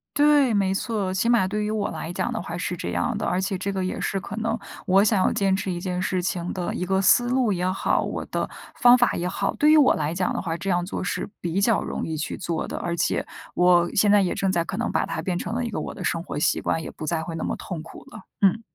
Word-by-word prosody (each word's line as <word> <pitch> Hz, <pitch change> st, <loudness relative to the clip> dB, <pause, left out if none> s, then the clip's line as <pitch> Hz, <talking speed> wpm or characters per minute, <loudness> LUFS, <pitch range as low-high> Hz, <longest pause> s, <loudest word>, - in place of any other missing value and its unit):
对， 290 Hz, -4 st, +4 dB
没 195 Hz, -2 st, +2 dB
错。 200 Hz, -2 st, -2 dB
起 230 Hz, +5 st, +1 dB
码 230 Hz, -6 st, +4 dB
对 210 Hz, +2 st, -2 dB
于 210 Hz, -, -1 dB
我 215 Hz, -2 st, -1 dB
来 165 Hz, -, -5 dB
讲 -, -, -2 dB
的 -, -, -3 dB
话 175 Hz, 0 st, -5 dB
是 180 Hz, 0 st, -2 dB
这 175 Hz, -, -5 dB
样 -, -, -1 dB
的， -, -, -2 dB
而 180 Hz, -, 0 dB
且 190 Hz, 0 st, -1 dB
这 200 Hz, +1 st, -2 dB
个 190 Hz, -1 st, -2 dB
也 -, -, -3 dB
是 195 Hz, -, -1 dB
可 205 Hz, -, -7 dB
能 225 Hz, +1 st, -1 dB, 0.3 s
我 195 Hz, 0 st, +5 dB
想 205 Hz, -2 st, +3 dB
要 -, -, +3 dB
坚 195 Hz, -1 st, +2 dB
持 190 Hz, -1 st, -2 dB
一 175 Hz, -, -3 dB
件 180 Hz, 0 st, -3 dB
事 185 Hz, -1 st, 0 dB
情 175 Hz, -1 st, -2 dB
的 180 Hz, -2 st, -3 dB
一 180 Hz, -, -2 dB
个 190 Hz, +1 st, +1 dB
思 240 Hz, +6 st, +4 dB
路 250 Hz, -5 st, +2 dB
也 180 Hz, 0 st, -1 dB
好， 190 Hz, -, +1 dB
我 -, -, -4 dB
的 -, -, -3 dB, 0.3 s
方 245 Hz, 0 st, +7 dB
法 245 Hz, -, +3 dB
也 175 Hz, -, -2 dB
好。 180 Hz, -, -1 dB
对 300 Hz, +1 st, +4 dB
于 315 Hz, -, +7 dB
我 285 Hz, -4 st, +6 dB
来 150 Hz, +1 st, -1 dB
讲 180 Hz, +1 st, 0 dB
的 -, -, -2 dB
话， 165 Hz, -2 st, -3 dB
这 195 Hz, +3 st, -4 dB
样 175 Hz, -1 st, +1 dB
做 -, -, -4 dB
是 180 Hz, -, -3 dB
比 175 Hz, +3 st, -1 dB
较 225 Hz, 0 st, +3 dB
容 -, -, -4 dB
易 160 Hz, -1 st, -3 dB
去 155 Hz, +1 st, -3 dB
做 170 Hz, -2 st, -3 dB
的， -, -, -5 dB
而 170 Hz, -, -2 dB
且 -, -, 0 dB, 0.3 s
我 175 Hz, -1 st, +4 dB
现 205 Hz, 0 st, +4 dB
在 205 Hz, -1 st, +6 dB
也 180 Hz, -, 0 dB
正 195 Hz, -1 st, 0 dB
在 170 Hz, -2 st, 0 dB
可 190 Hz, -, -5 dB
能 235 Hz, +3 st, -1 dB
把 -, -, +1 dB
它 -, -, -4 dB
变 180 Hz, -2 st, -2 dB
成 225 Hz, -, -4 dB
了 250 Hz, -, -1 dB
一 235 Hz, -, -2 dB
个 210 Hz, -, -3 dB
我 -, -, -5 dB
的 185 Hz, -, -7 dB
生 170 Hz, -2 st, 0 dB
活 160 Hz, -, -6 dB
习 150 Hz, -, +2 dB
惯， 160 Hz, -, -1 dB
也 -, -, -6 dB
不 155 Hz, -, -7 dB
再 165 Hz, -2 st, -1 dB
会 165 Hz, -, -6 dB
那 -, -, -4 dB
么 -, -, -2 dB
痛 175 Hz, -5 st, -6 dB
苦 165 Hz, -, -12 dB
了， -, -, -9 dB, 0.2 s
嗯。 200 Hz, +3 st, +4 dB
190 Hz, 310 characters per minute, -24 LUFS, 175-210 Hz, 0.3 s, 方